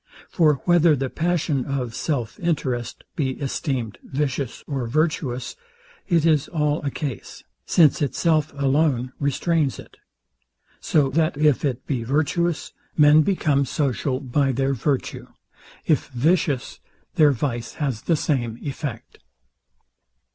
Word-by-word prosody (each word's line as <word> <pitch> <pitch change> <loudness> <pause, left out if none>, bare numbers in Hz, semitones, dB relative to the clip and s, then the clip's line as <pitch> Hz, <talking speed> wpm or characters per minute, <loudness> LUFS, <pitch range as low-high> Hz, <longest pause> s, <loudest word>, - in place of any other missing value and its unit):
For 155 -4 +4
whether 175 -3 +5
the 135 -1 -3
passion 160 -5 0
of 130 -4 -3
self 125 -5 -3
interest 130 -8 -2
be 135 -4 -1
esteemed 130 -5 -3
vicious 135 -2 -3
or 135 -4 -3
virtuous, 145 -2 -1 0.5
it 170 -4 +2
is 155 -4 +3
all 150 -2 0
a 145 - -2
case; 135 -4 -6 0.2
since 155 -5 +4
itself 155 +2 +1
alone 135 -3 +1
restrains 145 +1 0
it: - - -13 0.8
So 145 -4 +2
that 155 +1 +1
if 150 -3 +3
it 130 -4 -2
be 130 -5 -2
virtuous, 155 +6 0 0.2
men 150 0 +7
become 150 -5 +1
social 130 -2 -1
by 135 +1 0
their 135 +2 0
virtue; 135 +2 -2 0.6
if 155 - +1
vicious, 145 0 0 0.3
their 155 -5 +5
vice 120 -2 -3
has 135 -8 -2
the 170 - +1
same 120 -7 -1
effect. 140 -5 -6
145 Hz, 125 wpm, -23 LUFS, 130-155 Hz, 0.8 s, men